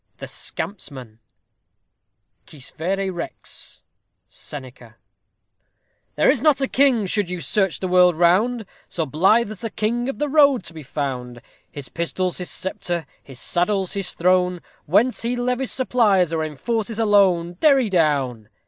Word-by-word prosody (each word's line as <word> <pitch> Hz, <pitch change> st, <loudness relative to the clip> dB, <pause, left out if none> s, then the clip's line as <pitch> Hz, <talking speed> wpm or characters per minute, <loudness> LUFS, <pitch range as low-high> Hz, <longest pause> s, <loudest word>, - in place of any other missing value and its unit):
THE -, -, -7 dB
SCAMPSMAN 130 Hz, -, -6 dB, 1.3 s
Quis 140 Hz, -5 st, -11 dB
verè 190 Hz, +3 st, -2 dB
rex? 170 Hz, -, -9 dB, 0.4 s
SENECA. 125 Hz, -5 st, -10 dB, 1.2 s
There -, -, +2 dB
is -, -, +3 dB
not 300 Hz, -3 st, +4 dB
a 270 Hz, -, 0 dB
king, 260 Hz, -6 st, +3 dB
should 195 Hz, -1 st, 0 dB
you 180 Hz, -1 st, -4 dB
search 190 Hz, +1 st, 0 dB
the 190 Hz, -, -2 dB
world 180 Hz, -1 st, +5 dB
round, 205 Hz, +8 st, +2 dB, 0.2 s
So 165 Hz, -, -3 dB
blithe 195 Hz, -, +2 dB
as 215 Hz, -, -9 dB
the 225 Hz, -, -3 dB
king 235 Hz, +4 st, -1 dB
of 270 Hz, -, -5 dB
the 295 Hz, -, -1 dB
road 280 Hz, -6 st, +4 dB
to 170 Hz, -, -10 dB
be 160 Hz, -, -9 dB
found; 125 Hz, -4 st, -5 dB, 0.3 s
His 140 Hz, -3 st, -7 dB
pistol's 180 Hz, +2 st, -2 dB
his 180 Hz, -, -5 dB
sceptre, 175 Hz, -3 st, -4 dB, 0.2 s
his 135 Hz, -2 st, -13 dB
saddle's 190 Hz, +6 st, 0 dB
his 195 Hz, -3 st, -3 dB
throne, 180 Hz, 0 st, +1 dB, 0.3 s
Whence 220 Hz, +10 st, +2 dB
he 235 Hz, +2 st, -1 dB
levies 250 Hz, -1 st, -1 dB
supplies, 210 Hz, -, +2 dB
or 160 Hz, -1 st, 0 dB
enforces 215 Hz, -, -3 dB
a 225 Hz, -, +1 dB
loan. 185 Hz, -5 st, +3 dB
_Derry 270 Hz, -, +4 dB
down. 140 Hz, -, 0 dB
185 Hz, 150 wpm, -22 LUFS, 160-225 Hz, 1.3 s, world